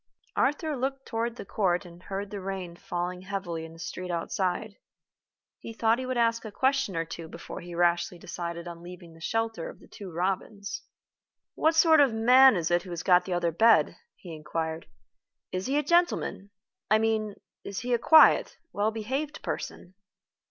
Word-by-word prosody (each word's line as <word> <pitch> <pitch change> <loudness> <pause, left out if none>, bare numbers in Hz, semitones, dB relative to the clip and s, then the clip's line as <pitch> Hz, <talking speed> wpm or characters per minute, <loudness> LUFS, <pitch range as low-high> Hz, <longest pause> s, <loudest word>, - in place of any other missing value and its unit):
Arthur 295 +2 +1
looked 270 +1 -3
toward 230 0 -2
the 240 - -8
court 185 -3 0
and 175 0 -13
heard 195 +1 -5
the 205 -2 -5
rain 185 -2 -5
falling 175 +1 -4
heavily 185 -4 -4
in 165 - -11
the - - -14
street 180 +2 -6
outside. 185 +4 -2 0.8
He 230 - -8
thought 225 +1 +2
he 260 - -4
would 255 -1 -2
ask 230 -1 +2
a 220 - -7
question 265 -4 +1
or 165 - 0
two 165 0 -8
before - - -8
he 175 0 -8
rashly 175 0 +1
decided 170 -1 -6
on 170 -1 -8
leaving 175 -1 -11
the 165 - -17
shelter 225 -2 -2
of - - -12
The - - -17
Two 195 -3 -10
Robins. 195 +3 -3 0.7
"What 320 +1 +2
sort 320 -1 +6
of 275 -5 +5
man 255 +3 +7
is 170 -2 -1
it 175 0 +3
who 185 - -11
has 170 -1 -5
got 180 -1 +5
the 185 - -3
other 175 -1 +1
bed?" 225 +7 +4 0.2
he 175 -3 -10
inquired. 160 +1 -4 0.6
"Is 185 +4 -3
he 275 +2 +1
a 295 - +2
gentleman? 345 - +1 0.4
I 215 - +6
mean, 220 -2 0 0.3
is 200 0 -5
he 245 +1 -1
a 240 - +3
quiet, 315 +6 +6 0.2
well 205 +1 +1
behaved 260 +8 -4
person?" 180 - -5
195 Hz, 185 wpm, -28 LUFS, 175-230 Hz, 0.8 s, man